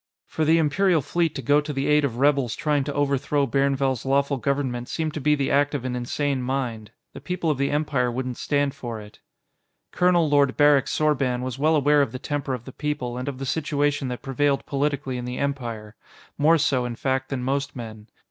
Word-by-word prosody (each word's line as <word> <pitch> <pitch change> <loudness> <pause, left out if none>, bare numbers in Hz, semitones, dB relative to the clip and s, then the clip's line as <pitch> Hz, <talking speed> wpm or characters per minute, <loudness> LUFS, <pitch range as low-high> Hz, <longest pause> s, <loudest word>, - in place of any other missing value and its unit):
For 160 - -2
the 160 +2 +4
Imperial 165 +1 +2
Fleet 170 0 0
to 135 - -5
go 145 +5 +4
to 150 0 -5
the 135 -1 -2
aid 150 0 +3
of 125 -4 -1
rebels 135 -3 +2
trying 150 -2 0
to 145 - -3
overthrow 140 0 +1
Bairnvell's 135 -1 0
lawful 140 +1 +1
government 130 -3 -2
seemed 160 -2 -2
to 155 - -4
be 150 +2 +3
the 140 -2 -1
act 145 +1 +2
of 130 -3 -4
an 125 -1 -2
insane 135 +2 -1
mind. 125 -5 -3 0.2
The - - -9
people 180 -3 -1
of 140 - -3
the 140 - +1
Empire 145 -4 0
wouldn't 125 0 -4
stand 145 -1 0
for 120 -6 -6
it. 105 0 -13 0.7
Colonel 180 -2 +3
Lord 145 -2 +3
Barrick 145 -2 +5
Sorban 135 -5 0
was 130 +1 -5
well 155 +2 +3
aware 145 0 +4
of 140 - -1
the - - -3
temper 140 -1 -3
of 120 -1 -10
the 130 - -8
people 145 -4 -3
and 125 +2 -5
of 140 -2 -4
the 135 - -5
situation 145 -1 0
that 125 -1 -5
prevailed 140 +1 0
politically 140 -2 -2
in 125 - -5
the 125 0 -4
Empire 120 -6 -4 0.4
more 160 +3 +4
so, 135 -4 +1
in 120 -1 -4
fact, 130 +1 -1
than 130 -3 -3
most 140 +2 -2
men. 110 -3 -8
140 Hz, 215 wpm, -24 LUFS, 125-145 Hz, 0.7 s, Barrick